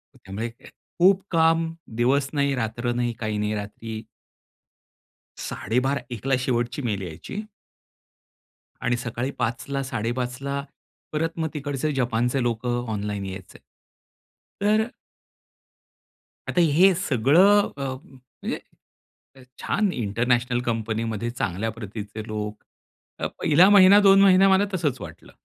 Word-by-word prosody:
त्यामुळे 105 +5 -5
खूप 190 +2 +1
काम, 165 0 +3 0.2
दिवस 135 +3 +2
नाही, 140 -1 +1
रात्र 120 +1 -2
नाही. 120 -1 -1
काही 110 -2 -2
नाही 105 +1 -1
रात्री 110 +2 -6 1.4
12.30 130 +4 -1
1ला 135 +3 0
शेवटची 125 +1 -1
मेल 105 -5 -2
यायची 95 - -7 1.4
आणि 120 0 +1
सकाळी 125 +2 -3
5ला 135 +4 -2
5.30ला 130 +2 -3 0.5
परत 165 +2 -1
मग 160 - 0
तिकडचे 145 0 -2
जपानचे 125 +1 0
लोक 115 0 -2
ऑनलाईन 105 -5 -2
यायचे. 95 0 -8 1.0
तर 215 +2 +3 1.6
आता 175 - +2
हे 170 +5 +5
सगळं 180 - +4
अ, 140 - -4 0.6
म्हणजे - - -2 1.0
छान 205 -2 +1
इंटरनॅशनल 120 +3 0
कंपनीमध्ये 115 0 -2
चांगल्या 110 -2 -2
प्रतीचे 105 0 -7
लोक. 105 -1 -5 0.6
तर - - -1
1हिला 175 +6 +5
महिना, 200 0 +8
2 195 -1 +6
महिना 195 0 +6
मला 190 +2 +4
तसंच 150 -9 -1
वाटलं - - -10
125 Hz, 110 wpm, -24 LUFS, 115-160 Hz, 1.6 s, महिना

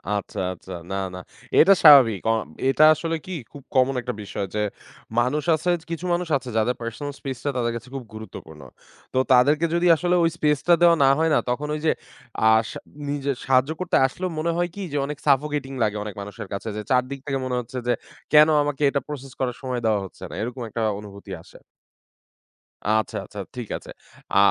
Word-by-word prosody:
আচ্ছা, 100 - -4
আচ্ছা। 95 +1 -13 0.2
না, - - -1 0.2
না। - - -6 0.4
এটা 195 +5 +8
স্বাভাবিক। 135 - +8
আ - - +3 0.4
এটা 140 +3 +4
আসলে 165 +1 -2
কি 185 - -8 0.2
খুব 145 - -12
কমন 130 +1 +3
একটা 125 - -4
বিষয় 100 0 -4
যে 105 - +1 0.6
মানুষ 130 +5 +1
আছে 160 +3 -2 0.2
কিছু 165 +2 -4
মানুষ 175 0 -1
আছে 130 -2 -9
যাদের 115 +3 +1
পার্সোনাল 115 +5 -5
স্পেস 135 -2 -5
টা 145 - 0
তাদের 120 -1 0
কাছে 115 +2 -8
খুব 135 - -4
গুরুত্বপূর্ণ। 80 -8 -10 0.5
তো - - -1 0.2
তাদেরকে 145 +6 +4
যদি 175 +1 +2
আসলে 175 +2 +1
ওই 165 - +4
স্পেস 150 -2 +2
টা 175 - +7
দেওয়া 170 -1 +7
না 135 - +6
হয় 160 0 +3
না - - +4
তখন 140 +5 -1
ওই - - -4
যে 155 - +5 0.6
আ - - +7 0.2
সা - - -7 0.3
নিজে 140 -1 -1
সাহায্য 135 +2 +3
করতে 185 -1 -1
আসলেও 180 +7 -4
মনে 170 +2 0
হয় 175 0 0
কি 200 - -6
যে - - 0
অনেক 150 +1 -5
সাফোকেটিং 140 0 +1
লাগে 105 -1 0
অনেক 105 -2 -7
মানুষের 100 -1 -8
কাছে 100 - -5
যে 105 - -3
৪ 125 -1 +4
দিক 140 0 -5
থেকে 135 -2 -1
মনে 125 - -2
হচ্ছে 125 +1 -7
যে 120 - +3 0.4
কেনো 155 +1 +7
আমাকে 145 0 -3
এটা 140 - 0
প্রসেস 135 -3 -7
করার 125 -2 -1
সময় 130 -2 -2
দেওয়া 110 -2 +3
হচ্ছে 95 - -13
না। - - -10
এরকম 125 +3 -4
একটা 115 +2 -4 0.2
অনুভূতি 100 -1 -11
আসে। - - -16 1.3
আচ্ছা, 110 +1 +1
আচ্ছা 105 - -10 0.2
ঠিক 120 -3 -5
আছে। - - -12 0.4
আ - - +3
135 Hz, 205 wpm, -24 LUFS, 115-150 Hz, 1.3 s, এটা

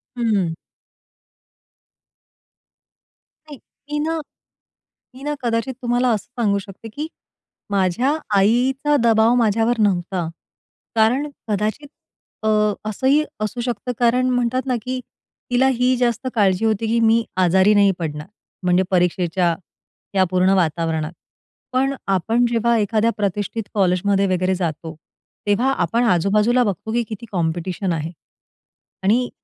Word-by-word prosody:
हं. 210 -8 0 2.9
नाही. 295 -2 -10 0.3
मी 295 - -1
ना 325 0 -1 1.0
मी 270 - -11
ना 295 - -1
कदाचित 235 +3 -1
तुम्हाला 245 +1 +1
असं 210 - -4
सांगू 200 -3 +2
शकते, 200 +3 -11
की 295 +8 -5 0.6
माझ्या 200 - +1 0.2
आईचा 260 +8 +2
दबाव 225 0 +4
माझ्यावर 230 0 +2
नव्हता. 180 -3 0 0.7
कारण 235 +6 +3 0.2
कदाचित 215 +8 -1 0.6
अ, - - 0 0.4
असंही 265 +8 +2 0.2
असू 215 +3 -2
शकतं 240 0 -3
कारण 250 +2 +3
म्हणतात 245 +1 0
ना, 255 -2 0
की 255 +2 -3 0.5
तिला 255 +2 +4
ही 250 +1 +2
जास्त 240 +1 0
काळजी 200 -1 +2
होती, 220 0 0
की 230 +1 +1
मी 225 0 +4 0.2
आजारी 190 +4 +4
नाही 200 -1 +5
पडणार. 150 -2 -4 0.4
म्हणजे 180 +1 +3
परीक्षेच्या 175 -1 +1 0.6
या 190 - +5
पूर्ण 185 +1 +3
वातावरणात, 160 -2 0 0.6
पण 270 +2 +2 0.2
आपण 225 +7 +1
जेव्हा 235 0 +2
एखाद्या 220 +2 +1
प्रतिष्ठित 205 +2 -2
कॉलेजमध्ये 195 0 +2
वगैरे 185 0 +1
जातो. 165 -2 -4 0.5
तेव्हा 235 +6 +2
आपण 180 +8 +1
आजू-बाजूला 210 +5 +3
बघतो, 205 0 -3
की 240 - +1
किती 220 +1 -7
कॉम्पिटिशन 175 +1 -1
आहे. 160 +1 -3 0.9
आणि 235 +6 +2
215 Hz, 120 wpm, -21 LUFS, 185-245 Hz, 2.9 s, नाही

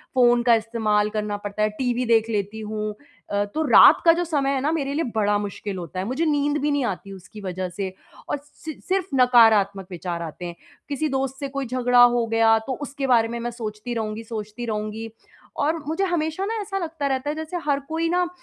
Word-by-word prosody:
Phone 240 -1 +5
का 235 -1 +6
इस्तेमाल 215 -2 0
करना 210 -1 -2
पड़ता 205 +1 -5
है, 215 - +3
टीवी 245 +3 -1
देख 225 -1 +3
लेती 210 0 -2
हूँ। 215 0 -4 0.4
अ, 205 0 +1
तो 305 +10 -2
रात - - +8
का 335 - +9
जो 345 +1 0
समय 290 -4 0
है 265 - 0
ना 295 +3 +1
मेरे 280 -4 -1
लिए 325 +3 0
बड़ा 205 -1 +2
मुश्किल 205 -1 -5
होता 180 +1 -6
है। 190 - -2
मुझे 265 +8 -1
नींद 290 -1 +1
भी 295 - +1
नहीं 285 -3 +1
आती 195 -1 -4
उसकी 195 +3 -12
वजह 185 -1 -4
से 190 +1 -5 0.4
और - - 0
सि 310 +1 -9 0.2
सिर्फ़ 380 -1 +1
नकारात्मक 220 -7 +5
विचार 175 -1 -4
आते 170 +2 -6
हैं। 175 -1 -6 0.3
किसी 290 +2 -1
दोस्त 270 0 -2
से 280 - -3
कोई 275 0 -4
झगड़ा 245 0 +3
हो 240 -1 +4
गया 225 0 +4
तो 260 - -1
उसके 280 -1 -4
बारे 235 -3 +4
में 235 +1 -5
मैं 240 +1 -3
सोचती 225 0 -5
रहूँगी, 220 0 -3
सोचती 220 +1 -6
रहूँगी 215 0 -4 0.5
और 310 +3 0
मुझे 325 +5 -1
हमेशा 335 +1 -1
ना 445 +1 -2
ऐसा 390 -1 -4
लगता 325 -5 -3
रहता 265 +1 -1
है 300 - -2
जैसे 315 +3 -4
हर 285 -2 +2
कोई 325 +1 0
ना 355 +1 +1
235 Hz, 220 wpm, -23 LUFS, 210-285 Hz, 0.5 s, का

